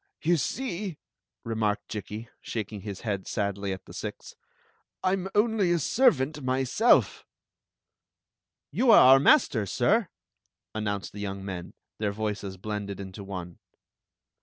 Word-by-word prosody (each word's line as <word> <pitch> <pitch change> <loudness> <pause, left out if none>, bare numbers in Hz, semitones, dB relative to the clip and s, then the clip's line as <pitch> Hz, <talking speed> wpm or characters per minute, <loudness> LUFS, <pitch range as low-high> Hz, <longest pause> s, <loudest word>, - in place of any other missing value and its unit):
"You 170 +2 +3
see," 190 - -3 0.5
remarked 110 -2 -1
Jikki, 105 +2 -6
shaking 105 -2 -5
his 100 -1 -7
head 100 -4 -3
sadly 100 -2 -2
at 95 -1 -6
the - - -12
six, - - -7 0.7
"1 185 - +2
'm 190 0 -2
only 210 -4 +3
a 175 - +3
servant 155 - +2
myself. 130 - +3 0.8
" - - -63
You 255 - +2
are 225 - +9
our 135 - +7
master, 135 - +4
sir! 190 - +2 0.3
" - - -53
announced 105 -2 -3
the 105 - -8
young 100 -1 -4
men, 90 -3 -6 0.2
their 105 -1 0
voices 100 -2 -4
blended 100 0 -5
into 95 +1 -7
one. 90 -3 -7
110 Hz, 135 wpm, -27 LUFS, -, 0.8 s, are